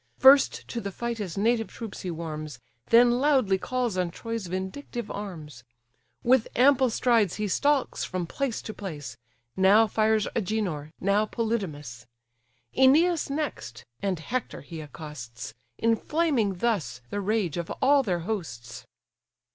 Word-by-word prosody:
First 270 +1 +6
to 235 - -3
the 200 - -4
fight 235 +3 -4
his 195 -3 -5
native 225 +2 +2
troops 225 -3 -8
he 185 - -4
warms, 155 -4 -5 0.3
Then 240 +1 +5
loudly 260 -9 +3
calls 245 -3 -2
on 180 -1 0
Troy's 230 +2 -5
vindictive 190 +6 -5
arms; 155 -11 -7 0.6
With 245 -1 +4
ample 260 0 +5
strides 225 -5 +2
he 210 0 -2
stalks 285 +7 +1
from 180 -2 -3
place 260 +6 -3
to 215 - -6
place; 160 -9 -7 0.4
Now 200 +4 +6
fires 215 -1 +1
Agenor, 190 -8 -2
now 200 +3 +2
Polydamas: 155 - -3 0.7
Æneas 310 +6 +4
next, 190 - -4 0.2
and 195 -3 0
Hector 245 +11 -4
he 160 +2 -8
accosts; 125 -8 -8 0.2
Inflaming 230 - +1
thus 175 - -1
the 205 - -2
rage 200 -5 0
of 170 -1 -4
all 280 +1 +5
their 180 -8 -1
hosts. 125 - -5
210 Hz, 135 wpm, -27 LUFS, 170-240 Hz, 0.7 s, First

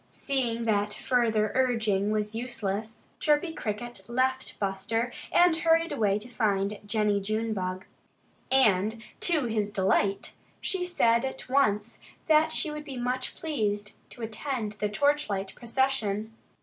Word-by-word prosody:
Seeing 235 -4 -1
that 205 -1 +1
further 225 -4 +1
urging 220 -6 +2
was 210 0 -1
useless, 225 -2 -4
Chirpy 300 +2 +2
Cricket 240 -1 -4
left 260 +2 0
Buster 210 +5 -1 0.2
and 350 -1 +5
hurried 330 +1 +3
away 205 -2 +2
to 215 +3 -8
find 205 -3 0
Jennie 210 -1 +1
Junebug. 195 -3 -2 0.7
And 220 -3 +3 0.2
to 320 -6 +2
his 215 -3 0
delight, 195 0 +1 0.3
she 375 -2 -2
said 235 -10 +3
at 265 0 -5
once 235 -5 +1 0.3
that 315 0 +4
she 315 - 0
would 300 0 -6
be 275 -3 -7
much 250 +1 -2
pleased 210 -9 -1 0.2
to 240 - -10
attend 225 0 -3
the 210 0 -2
torchlight 210 -6 0
procession. 230 -4 -1
225 Hz, 130 wpm, -28 LUFS, 210-265 Hz, 0.7 s, and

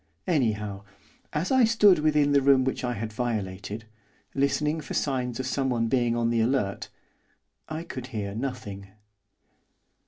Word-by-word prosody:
Anyhow, 105 - 0 0.5
as 155 - -1
I 260 -1 +5
stood 210 -6 +5
within 150 -1 +3
the 140 -1 +5
room 135 -1 +5
which 130 0 -2
I 125 -1 -1
had 110 +1 -5
violated, 105 -2 -3 0.5
listening 150 +3 +1
for - - -6
signs 125 -4 -1
of 130 - -2
someone 125 -4 0
being 120 -1 +2
on 115 0 +1
the 115 -1 +2
alert, 110 -5 0 0.8
I 155 +1 -4
could 130 -7 -7
hear 105 -5 -4
nothing. 110 -5 -5
125 Hz, 145 wpm, -27 LUFS, 110-145 Hz, 0.8 s, I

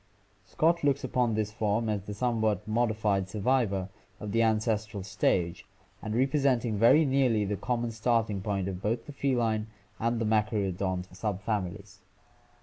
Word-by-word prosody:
Scott 170 - +1
looks 140 -1 +2
upon 125 -3 +1
this 105 -1 -1
form 110 0 0
as 105 -2 -1
the 105 +1 -7
somewhat 110 -3 0
mod 115 +2 +2
ified 105 -3 0
survivor 105 -3 0 0.3
of 105 - -5
the 115 +2 +2
ancestral 110 -2 0
stage, 90 0 0 0.4
and 110 0 -4
representing 130 -3 +2
very 145 +8 +6
nearly 130 -6 +2
the 105 +1 -1
common 120 +2 -2
starting 115 -3 0
point 100 -2 -2
of 95 -1 -5
both 115 +3 -1
the - - -8
feline 120 -6 0 0.3
and 115 +1 0
machaerodont 100 -4 0
subfamilies. 100 -1 -3
110 Hz, 145 wpm, -29 LUFS, 100-120 Hz, 0.4 s, very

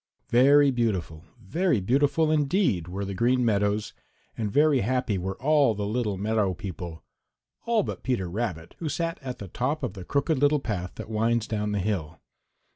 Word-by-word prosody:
Very 140 +3 +6
beautiful, 95 -9 -2
very 150 - 0
beautiful 145 - +2
indeed, 145 - +1
were 95 +3 -4
the 100 - -4
Green 120 +4 +2
Meadows, 105 -1 0 0.4
and 105 -3 -3
very 145 +2 +4
happy 125 -3 0
were 95 +2 -4
all 145 -5 +3
the 100 0 -3
little 105 -2 -1
meadow 105 -2 0
people 85 -5 -7 0.6
all 230 -3 +3
but - - -5
Peter 120 -8 -1
Rabbit, 90 -4 -4
who 160 - -3
sat 165 +2 -2
at 130 -2 -5
the 100 - -8
top 135 - -2
of 120 -7 -2
the 95 - -8
Crooked 140 - 0
Little 145 +1 +3
Path 95 -8 -4
that - - -7
winds 115 +1 +1
down 105 -2 -2
the 105 - -1
hill. 90 -6 -2
110 Hz, 175 wpm, -26 LUFS, 95-140 Hz, 0.6 s, Very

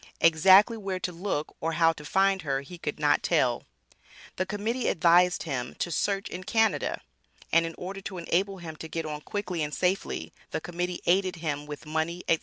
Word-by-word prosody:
Exactly 190 +7 +6
where 195 -3 -3
to 180 - -3
look 170 -3 -3
or 165 +1 -1
how 165 0 +4
to 150 - -11
find 195 +5 +2
her 135 -3 -1
he 170 +5 -11
could 150 -2 -4
not 150 -1 +3
tell. 130 -8 +1 0.7
The 185 - -1
Committee 220 +5 -2
advised 175 +1 +4
him 125 -6 -4
to 175 - -3
"search 195 +4 0
in 185 - -6
Canada." 225 +3 +1 0.5
And 165 0 +5
in 165 - -7
order 195 +2 -6
to 190 -1 -6
enable 190 +3 0
him 165 -3 -8
to 160 - -7
get 165 0 -4
on 150 -1 -5
quickly 200 -3 -3
and 150 0 -2
safely, 185 +2 -1 0.2
the - - -2
Committee 175 0 -4
aided 185 +1 +2
him 150 -3 -3
with 150 +1 -8
money, 160 +3 -2
&c. 165 - +3
175 Hz, 195 wpm, -28 LUFS, 160-190 Hz, 0.7 s, Exactly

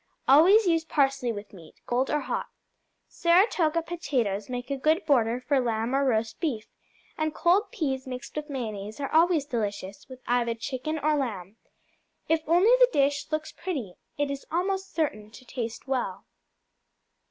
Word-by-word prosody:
Always 365 +11 +7
use 330 -2 +2
parsley 275 -5 +1
with 205 -1 -8
meat, 170 -5 -14
cold 250 +2 0
or 300 - +1
hot. - - -3 0.6
Saratoga 340 -2 +2
potatoes 250 - -2
make 250 +1 -5
a - - +1
good 310 +6 +1
border 240 -4 +2
for 275 +2 +1
lamb 230 0 -1
or 275 +1 +2
roast 225 -4 0
beef, 250 -10 -2 0.5
and 310 0 -1
cold 365 +5 +3
peas 265 -4 -2
mixed 250 -1 -7
with 300 0 -4
mayonnaise 215 -4 -5
are 275 +1 -4
always 325 -2 +4
delicious 205 -6 -4
with 260 -1 -10
either 235 -1 +1
chicken 265 +6 -4
or 305 0 +1
lamb. 215 -7 -4 0.7
If 320 0 +2
only 355 +8 +5
the - - +6
dish 285 - +1
looks 310 0 -2
pretty, 275 - -5 0.2
it 290 -1 0
is 280 -1 -6
almost 385 +3 -1
certain 215 -10 -2
to 255 +3 -15
taste 235 0 -5
well. 265 -2 -2
275 Hz, 160 wpm, -27 LUFS, 235-315 Hz, 0.7 s, Always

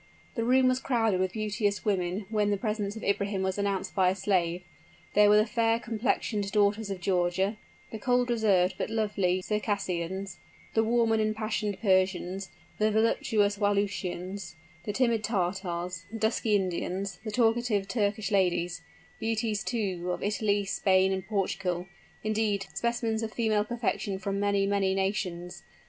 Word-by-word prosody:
The 230 - -1
room 255 +2 +4
was 255 0 +2
crowded 225 -7 +1
with 185 0 0
beauteous 210 -1 -1
women 190 -1 0
when 210 -2 +2
the 205 - +1
presence 210 0 -2
of 220 - -8
Ibrahim 200 -1 0
was 190 +1 -1
announced 195 -1 -1
by 185 -2 +4
a 185 - 0
slave. 180 -3 0 0.5
There 210 0 +6
were 210 - +7
the 215 - +5
fair 230 0 +2
complexioned 220 -3 -1
daughters 210 +1 +2
of 195 -2 -4
Georgia 190 +3 +1 0.3
the 220 - -5
cold, 245 +1 +2
reserved, 195 -5 +3
but - - -1
lovely 200 -5 0
Circassians 190 -3 -2 0.3
the 225 - +3
warm 230 0 +2
and 220 -1 +3
impassioned 215 -2 -1
Persians 190 -1 +1 0.3
the 215 0 +3
voluptuous 215 -1 +2
Wallachians 195 -3 -1 0.3
the 210 - -1
timid 230 -1 +1
Tartars 180 -3 -2
the 225 - -5
dusky 220 0 +1
Indians 190 0 -2
the 220 - -4
talkative 225 -3 +1
Turkish 215 -1 -1
ladies 180 -3 +1 0.4
beauties, 220 -2 -1
too, 190 -7 -2
of - - -5
Italy, 205 -1 +1
Spain, 190 -1 +3
and 190 -1 -4
Portugal 185 -3 -1 0.4
indeed, 215 -2 0
specimens 235 -2 -1
of 220 -1 -4
female 215 -3 +1
perfection 220 -3 -2
from 195 +1 -3
many, 200 -1 +2
many 195 -1 +1
nations. 185 -3 -2
205 Hz, 150 wpm, -29 LUFS, 190-220 Hz, 0.5 s, were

